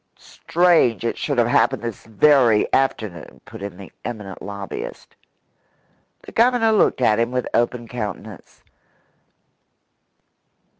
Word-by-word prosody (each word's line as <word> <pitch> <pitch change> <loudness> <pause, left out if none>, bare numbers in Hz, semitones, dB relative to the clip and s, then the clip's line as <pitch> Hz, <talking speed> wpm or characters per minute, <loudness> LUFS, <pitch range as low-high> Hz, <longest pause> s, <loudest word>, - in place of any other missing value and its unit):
"Strange 165 - +1
it 115 - -1
should 140 -3 -3
have 120 - +4
happened 120 - +2
this 115 -4 -6
very 115 -1 +4
afternoon," 110 -10 -2
put 110 0 -11
in 100 -2 -7
the 95 -1 -11
eminent 105 -5 -7
lobbyist. 100 0 -7 1.1
The - - -11
Governor 235 -1 +3
looked 210 -10 +2
at 110 -3 +3
him 115 0 +1
with 125 0 -2
open 120 0 0
countenance. 110 -3 -8
115 Hz, 115 wpm, -21 LUFS, 105-135 Hz, 1.1 s, have